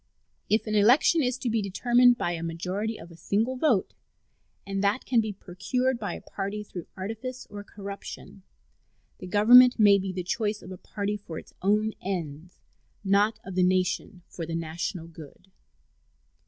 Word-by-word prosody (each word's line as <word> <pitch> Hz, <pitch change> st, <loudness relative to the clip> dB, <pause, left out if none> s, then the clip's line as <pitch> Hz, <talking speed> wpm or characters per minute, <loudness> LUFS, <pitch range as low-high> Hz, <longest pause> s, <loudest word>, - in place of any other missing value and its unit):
If 215 Hz, -, +2 dB
an 215 Hz, -, -3 dB
election 245 Hz, +10 st, +5 dB
is 250 Hz, -2 st, 0 dB
to 255 Hz, -, -4 dB
be 225 Hz, -1 st, +1 dB
determined 240 Hz, +5 st, +4 dB
by 175 Hz, -, -1 dB
a 170 Hz, -1 st, -4 dB
majority 185 Hz, +7 st, -3 dB
of 170 Hz, -, -12 dB
a -, -, -13 dB
single 210 Hz, +9 st, -1 dB
vote, 250 Hz, -7 st, +1 dB, 0.7 s
and 195 Hz, 0 st, -3 dB
that 205 Hz, +6 st, +1 dB
can 240 Hz, -3 st, +3 dB
be 215 Hz, -1 st, -3 dB
procured 240 Hz, +7 st, -2 dB
by -, -, -4 dB
a -, -, -9 dB
party 200 Hz, +1 st, -5 dB
through 180 Hz, -4 st, -9 dB
artifice 225 Hz, +6 st, -6 dB
or 205 Hz, 0 st, -7 dB
corruption, 200 Hz, -1 st, -9 dB, 0.8 s
the 185 Hz, -, -8 dB
Government 245 Hz, +6 st, +7 dB
may 205 Hz, -3 st, +6 dB
be 190 Hz, 0 st, -3 dB
the 185 Hz, -1 st, -4 dB
choice 210 Hz, +3 st, -2 dB
of -, -, -10 dB
a 185 Hz, -, -7 dB
party 205 Hz, 0 st, -3 dB
for 170 Hz, -6 st, -9 dB
its -, -, -11 dB
own 210 Hz, +3 st, +2 dB
ends, 175 Hz, -3 st, -5 dB, 0.4 s
not 205 Hz, +2 st, +2 dB
of 190 Hz, -, -7 dB
the 185 Hz, -, +1 dB
nation 185 Hz, 0 st, 0 dB
for 170 Hz, -, -7 dB
the 165 Hz, 0 st, -4 dB
national 165 Hz, +1 st, -4 dB
good. 165 Hz, +3 st, -14 dB
200 Hz, 170 wpm, -27 LUFS, 180-225 Hz, 0.8 s, Government